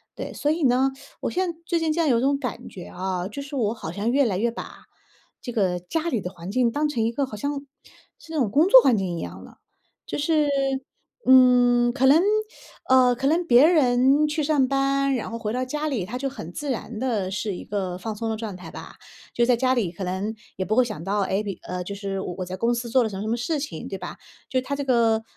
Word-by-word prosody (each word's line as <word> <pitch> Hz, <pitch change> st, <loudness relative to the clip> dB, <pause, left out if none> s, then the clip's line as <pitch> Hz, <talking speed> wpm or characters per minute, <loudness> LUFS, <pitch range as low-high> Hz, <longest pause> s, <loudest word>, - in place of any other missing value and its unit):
对。 -, -, -6 dB
所 295 Hz, -, -1 dB
以 320 Hz, +1 st, 0 dB
呢， 260 Hz, +1 st, +3 dB, 0.3 s
我 -, -, -2 dB
现 365 Hz, -1 st, -1 dB
在 330 Hz, -, -17 dB
最 340 Hz, -, 0 dB
近 325 Hz, -1 st, 0 dB, 0.2 s
有 235 Hz, -4 st, +3 dB
种 275 Hz, +2 st, +2 dB
感 250 Hz, -6 st, -5 dB
觉 180 Hz, -, -9 dB
啊， 185 Hz, 0 st, -3 dB
就 245 Hz, +8 st, -7 dB
是 280 Hz, +1 st, -8 dB
我 220 Hz, -4 st, +1 dB
好 190 Hz, -9 st, -7 dB
像 205 Hz, +6 st, -2 dB
越 275 Hz, +2 st, +3 dB
来 200 Hz, -6 st, 0 dB
越 235 Hz, +5 st, +1 dB
把， 235 Hz, -, -9 dB, 0.6 s
这 245 Hz, -, -5 dB
个 190 Hz, -6 st, +1 dB
家 320 Hz, -, -3 dB
里 245 Hz, -10 st, 0 dB
的 180 Hz, -, -5 dB
环 175 Hz, -1 st, -9 dB
境 240 Hz, +1 st, +2 dB
当 295 Hz, +5 st, 0 dB
成 245 Hz, -7 st, -1 dB
一 225 Hz, -, +1 dB
个 275 Hz, +4 st, -1 dB
好 255 Hz, -, -8 dB
像 285 Hz, +7 st, -3 dB, 0.6 s
是 320 Hz, -, -15 dB
那 320 Hz, -, -3 dB
种 240 Hz, -6 st, +2 dB
工 305 Hz, -, +3 dB
作 -, -, +10 dB
环 260 Hz, -, +4 dB
境 185 Hz, -3 st, -2 dB
一 -, -, -4 dB
样 -, -, -7 dB
的。 -, -, -15 dB, 0.5 s
就 -, -, -4 dB
是， 300 Hz, 0 st, +2 dB, 0.8 s
嗯， 245 Hz, -2 st, +6 dB
可 265 Hz, +1 st, +1 dB
能， 290 Hz, +5 st, +6 dB, 0.7 s
呃 255 Hz, -1 st, +5 dB
可 265 Hz, +3 st, -4 dB
能 325 Hz, +5 st, +3 dB
别 245 Hz, +2 st, +7 dB
人 275 Hz, -2 st, +4 dB
去 305 Hz, +1 st, -1 dB
上 285 Hz, -3 st, +2 dB
班， 275 Hz, 0 st, +1 dB
然 235 Hz, -, -4 dB
后 230 Hz, -, -5 dB
回 215 Hz, -2 st, -3 dB
到 255 Hz, +2 st, -1 dB
家 300 Hz, +4 st, -3 dB
里， 250 Hz, -11 st, -2 dB
他 220 Hz, -, -7 dB
就 270 Hz, +2 st, -2 dB
很 175 Hz, -, -9 dB
自 295 Hz, +7 st, -5 dB
然 230 Hz, -3 st, -4 dB
的 220 Hz, -7 st, -1 dB
是 200 Hz, 0 st, -3 dB
一 -, -, -8 dB
个 190 Hz, -3 st, -3 dB
放 215 Hz, +3 st, -5 dB
松 225 Hz, +2 st, -3 dB
的 220 Hz, -, -2 dB
状 215 Hz, -3 st, -5 dB
态 180 Hz, -, -10 dB
吧。 -, -, -10 dB, 0.4 s
就 240 Hz, -, +2 dB
在 250 Hz, -1 st, +4 dB
家 255 Hz, +1 st, +2 dB
里 220 Hz, -9 st, 0 dB
可 185 Hz, +2 st, -7 dB
能 190 Hz, +4 st, -3 dB, 0.2 s
也 190 Hz, -, -1 dB
不 215 Hz, +3 st, -1 dB
会 255 Hz, -, +5 dB
想 215 Hz, -8 st, -6 dB
到， 200 Hz, +3 st, 0 dB
诶， 195 Hz, +1 st, 0 dB
比 200 Hz, -4 st, -5 dB, 0.3 s
就 200 Hz, -, -4 dB
是 195 Hz, -1 st, -4 dB
我 180 Hz, -, -5 dB
我 185 Hz, -, -2 dB
在 180 Hz, +1 st, -5 dB
公 230 Hz, +5 st, +1 dB
司 235 Hz, 0 st, -4 dB
做 250 Hz, +2 st, +3 dB
了 220 Hz, -, -1 dB
什 200 Hz, -, -7 dB
么 195 Hz, -, -4 dB
什 -, -, -4 dB
么 225 Hz, -, +1 dB
事 290 Hz, +6 st, -2 dB
情， 275 Hz, -, -6 dB
对 195 Hz, -, -5 dB
吧！ 180 Hz, -1 st, -8 dB, 0.3 s
就 255 Hz, -, 0 dB
他 275 Hz, +2 st, -3 dB
这 285 Hz, -, -3 dB
个， 230 Hz, -4 st, +2 dB
240 Hz, 270 characters per minute, -24 LUFS, 205-275 Hz, 0.8 s, 作